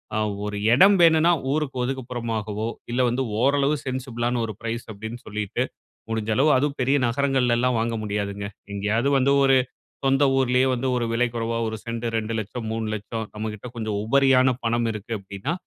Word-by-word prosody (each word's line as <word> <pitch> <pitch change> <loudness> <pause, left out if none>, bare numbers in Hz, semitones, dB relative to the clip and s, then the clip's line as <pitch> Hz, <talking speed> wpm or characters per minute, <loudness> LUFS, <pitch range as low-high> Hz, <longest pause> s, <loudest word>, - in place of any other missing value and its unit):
அ, - - +1 0.3
ஒரு 105 0 -3 0.2
எடம் 195 +9 +7
வேணும்னா 165 +1 +6 0.2
ஊருக்கு 145 -3 -1
ஒதுக்குப்புறமாகவோ, 115 -4 -3 0.2
இல்ல 125 +1 +1
வந்து 130 +2 0 0.2
ஓரளவு 140 +2 +3
சென்சிபிளான 125 -2 -2
ஒரு 110 - -5
பிரைஸ் 115 0 -4
அப்டின்னு 110 +4 -7
சொல்லிட்டு, 105 -1 -3 0.5
முடிஞ்ச 110 -1 -2
அளவு 145 +4 +4
அதுவும் 145 +1 0
பெரிய 135 +3 +3
நகரங்கள்ல 130 -1 +1
எல்லாம் 125 -1 +1
வாங்க 115 0 -1
முடியாதுங்க. 100 -1 -3 0.3
எங்கேயாவது 110 +6 0
வந்து 135 +1 +3
ஒரு 135 -1 +5 0.5
சொந்த 135 +1 +3
ஊர்லயே 130 0 +3
வந்து 125 +2 -2
ஒரு 120 - 0
விலை 120 +1 +2
குறைவா, 115 0 -1
1 110 - -4
சென்ட் 115 0 -4
2,00,000 110 +1 -3
3,00,000 110 0 -3
நம்மகிட்ட 105 +1 -5
கொஞ்சம் 110 -3 -3
உபரியான 130 +1 +4
பணம் 115 0 +1
இருக்கு 110 +2 -7
அப்டின்னா, 100 - -5
120 Hz, 155 wpm, -24 LUFS, 110-130 Hz, 0.5 s, எடம்